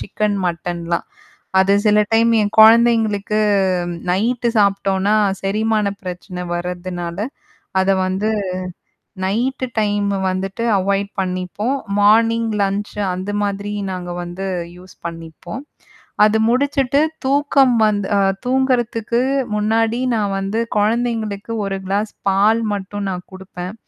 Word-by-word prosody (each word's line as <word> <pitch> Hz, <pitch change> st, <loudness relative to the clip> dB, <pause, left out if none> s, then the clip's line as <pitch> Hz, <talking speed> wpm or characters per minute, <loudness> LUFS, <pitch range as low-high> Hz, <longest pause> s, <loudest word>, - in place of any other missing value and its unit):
Chicken, 210 Hz, 0 st, -1 dB
மட்டன்லாம். 170 Hz, 0 st, -3 dB, 0.5 s
அது 195 Hz, +1 st, +3 dB
சில 210 Hz, 0 st, +5 dB
time 230 Hz, +1 st, +4 dB
என் 205 Hz, 0 st, 0 dB
குழந்தைங்களுக்கு 220 Hz, -2 st, +5 dB, 0.7 s
நைட்டு 235 Hz, +6 st, +1 dB
சாப்பிட்டோன்னா, 200 Hz, 0 st, +2 dB, 0.3 s
செரிமானப் 210 Hz, 0 st, 0 dB
பிரச்சனை 180 Hz, 0 st, -6 dB
வர்றதுனால, 175 Hz, 0 st, -4 dB, 0.6 s
அத 190 Hz, +1 st, +2 dB, 0.2 s
வந்து 190 Hz, +3 st, -1 dB, 1.0 s
நைட்டு 250 Hz, +6 st, -1 dB
டைம் 205 Hz, -1 st, +1 dB, 0.2 s
வந்துட்டு 195 Hz, +5 st, -3 dB
அவாய்ட் 200 Hz, +1 st, 0 dB
பண்ணிப்போம். 185 Hz, +7 st, -2 dB, 0.2 s
மார்னிங் 225 Hz, +2 st, +4 dB
லன்ச் 200 Hz, +1 st, -2 dB, 0.2 s
அந்த 190 Hz, +3 st, -4 dB
மாதிரி 205 Hz, 0 st, -2 dB, 0.2 s
நாங்க 180 Hz, -1 st, -5 dB
வந்து 175 Hz, +3 st, -5 dB, 0.3 s
யூஸ் 185 Hz, +1 st, -15 dB
பண்ணிப்போம். 165 Hz, +9 st, -8 dB, 0.6 s
அது 215 Hz, +1 st, +2 dB
முடிச்சுட்டு 275 Hz, +2 st, +2 dB, 0.2 s
தூக்கம் 275 Hz, -2 st, +3 dB
வந் 210 Hz, -1 st, +2 dB, 0.2 s
அ -, -, +3 dB, 0.3 s
தூங்குறதுக்கு 245 Hz, -3 st, +1 dB, 0.4 s
முன்னாடி 225 Hz, +3 st, +1 dB, 0.2 s
நான் 205 Hz, -2 st, -1 dB
வந்து 195 Hz, +3 st, -2 dB, 0.2 s
குழந்தைங்களுக்கு 220 Hz, -1 st, -1 dB
1 195 Hz, 0 st, -2 dB
கிளாஸ் 205 Hz, +2 st, -1 dB, 0.2 s
பால் 215 Hz, +4 st, +3 dB
மட்டும் 200 Hz, 0 st, -5 dB
நான் 180 Hz, -1 st, -6 dB
கொடுப்பேன். 190 Hz, 0 st, -8 dB
205 Hz, 110 wpm, -19 LUFS, 190-225 Hz, 1.0 s, சில